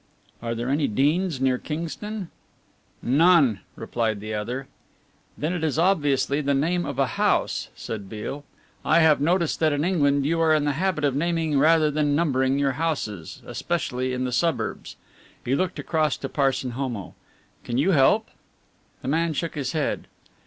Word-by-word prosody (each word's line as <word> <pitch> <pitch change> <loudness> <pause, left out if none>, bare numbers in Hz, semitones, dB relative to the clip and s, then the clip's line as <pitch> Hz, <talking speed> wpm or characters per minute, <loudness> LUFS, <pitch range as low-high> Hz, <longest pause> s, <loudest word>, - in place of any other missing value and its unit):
"Are 115 0 -3
there 120 +1 -3
any 145 +2 +1
'Deans' 150 - +1
near 130 -1 +1
Kingston?" 170 +5 -5 0.7
"None," 140 - +4 0.2
replied 110 -3 -2
the 110 +1 -5
other. 120 +6 -3 0.7
"Then 155 +4 -1
it 175 -3 -3
is 155 -2 0
obviously 150 -5 +2
the 140 -1 +1
name 170 +5 0
of - - -5
a - - +3
house," - - 0
said 100 -4 -6
Beale. 115 +7 -6 0.4
"I 170 +2 +4
have 155 -3 +4
noticed 170 +2 +1
that 155 -2 +3
in 145 +1 0
England 145 -6 +2
you 165 +3 +1
are 160 -1 +4
in 150 -1 +1
the 145 - +2
habit 165 +2 -1
of 140 -2 +2
naming 160 -1 +1
rather 155 0 +4
than 145 -1 +1
numbering 135 -4 +1
your 140 -1 +2
houses, 110 - -3
especially 130 -7 -2
in 125 0 -2
the 125 - -2
suburbs." 125 -5 -1 0.5
He 125 - 0
looked 180 +5 0
across 155 -3 0
to 135 - -5
Parson 135 -3 0
Homo, 120 -6 -4 0.5
"Can 120 - -3
you 160 +9 +3
help?" 135 -6 +4 0.8
The - - -5
man 165 +3 +1
shook 165 +3 -3
his 140 -1 -3
head. 155 -3 -2
145 Hz, 165 wpm, -24 LUFS, 130-165 Hz, 0.8 s, None